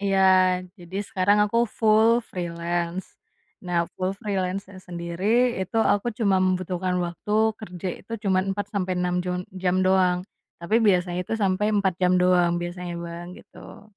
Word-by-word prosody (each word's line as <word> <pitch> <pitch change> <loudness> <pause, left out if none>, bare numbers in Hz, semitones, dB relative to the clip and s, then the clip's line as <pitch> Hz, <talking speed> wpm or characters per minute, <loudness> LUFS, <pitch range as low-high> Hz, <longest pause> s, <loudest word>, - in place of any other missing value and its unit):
iya. 195 -1 +1 0.6
Jadi, 175 +2 -9
sekarang 200 +2 +2
aku 230 +3 0 0.2
full 220 0 +5
freelance. 175 0 -4 0.5
Nah, 175 -1 0
full 185 0 -1
freelance-nya 195 -1 -3
sendiri 170 +1 -5 0.4
itu, 190 - -5 0.2
aku 205 +3 0
cuma 200 -5 +3
membutuhkan 185 0 0
waktu, 175 +4 -5 0.3
kerja 180 -3 -6
itu, 230 - -12
cuman 185 -1 +3
4-6 185 -3 -2
jun 180 0 -3 0.2
jam 180 0 +2
doang, 185 -1 +3 0.4
tapi 190 +7 +1
biasanya 180 -2 +2
itu 205 - -4
sampai 190 +1 +1
4 195 -2 +2
jam 180 0 +4
doang. 180 -1 +3
Biasanya, 175 0 -5
Bang, 170 +1 -7
gitu. - - -14
185 Hz, 135 wpm, -24 LUFS, 175-195 Hz, 0.6 s, full